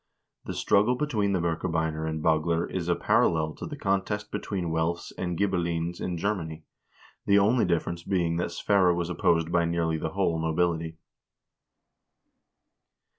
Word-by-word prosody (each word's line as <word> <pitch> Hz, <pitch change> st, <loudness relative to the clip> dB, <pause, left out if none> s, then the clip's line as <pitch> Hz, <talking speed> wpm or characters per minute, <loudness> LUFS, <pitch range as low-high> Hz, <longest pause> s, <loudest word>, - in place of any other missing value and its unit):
The -, -, -5 dB
struggle 105 Hz, +5 st, +3 dB
between 110 Hz, -8 st, 0 dB
the 95 Hz, -, +1 dB
Birkebeiner 80 Hz, -2 st, -1 dB
and 80 Hz, -1 st, -4 dB
Bagler 80 Hz, +1 st, +2 dB
is 90 Hz, -2 st, -4 dB
a 85 Hz, -, +3 dB
parallel 80 Hz, -2 st, +2 dB
to -, -, -7 dB
the -, -, -7 dB
contest 100 Hz, +2 st, -1 dB
be -, -, -2 dB
tween 90 Hz, -5 st, -3 dB
Welfs 80 Hz, +1 st, -1 dB
and 90 Hz, -2 st, -3 dB
Ghibellines 85 Hz, -3 st, -1 dB
in 90 Hz, -1 st, -2 dB
Germany, 80 Hz, -4 st, -3 dB, 0.6 s
the 100 Hz, -, +5 dB
only 110 Hz, +4 st, +4 dB
difference 85 Hz, 0 st, -1 dB
being 85 Hz, -2 st, 0 dB
that 85 Hz, -, -1 dB
Sverre 90 Hz, 0 st, +3 dB
was 85 Hz, 0 st, -2 dB
opposed 85 Hz, -1 st, +1 dB
by 85 Hz, -1 st, +3 dB
nearly 85 Hz, -1 st, 0 dB
the 80 Hz, -, -2 dB
whole 95 Hz, -4 st, +1 dB
nobility. 80 Hz, 0 st, 0 dB
85 Hz, 150 wpm, -27 LUFS, 80-95 Hz, 0.6 s, the